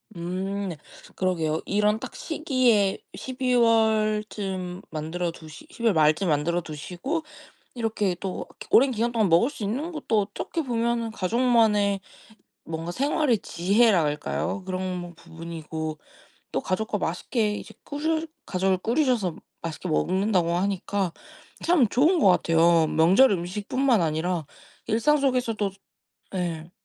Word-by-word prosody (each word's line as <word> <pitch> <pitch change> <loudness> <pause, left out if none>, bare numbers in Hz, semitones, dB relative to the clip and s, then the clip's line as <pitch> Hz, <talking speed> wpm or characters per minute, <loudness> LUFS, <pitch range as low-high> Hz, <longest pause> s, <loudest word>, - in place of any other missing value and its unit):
음 185 +3 -3 0.4
그러게요. 165 -4 0
이런 210 +2 +2
딱 - - -8
시기에 255 - +1 0.2
12 255 -1 -2
월쯤 215 -5 +1
만들어 160 +3 -3
두시 155 -2 -12
12 235 - -10
월 225 - +5
말쯤 155 +3 +3
만들어 165 +3 +1
두시고 180 - -4 0.5
이렇게 220 -5 0
또 190 -2 -4 0.2
오랜 270 +3 +6
기간동안 230 -2 +1
먹을 170 - +4
수 230 - -7
있는 275 - -2
것도 235 -9 0
어떻게 205 +10 -4
보면은 235 -2 -1
가족만의 210 -1 +2 0.7
뭔가 165 +1 -4
생활의 280 - +1
지혜랄까요? 185 -3 +1
그런 185 -2 -4
부분이고 160 -2 -6 0.5
또 - - 0
가족과 210 +3 -2
맛있게 210 +5 -1
이제 - - -9
꾸주 315 +2 -2 0.2
가족을 190 0 +1
꾸리셔서 230 - +1 0.3
맛있게 165 +2 -5
먹는다고 185 +1 +1
하니까 195 0 -1 0.5
참 320 - +4
좋은 315 - +3
것 200 - +6
같아요. 165 -2 +4
명절 190 +11 +5
음식뿐만 205 +7 0
아니라 160 +1 -1 0.4
일상 275 +8 +3
속에서도 245 -7 0 0.6
네. 170 -2 -3
200 Hz, 270 characters per minute, -25 LUFS, 175-235 Hz, 0.7 s, 오랜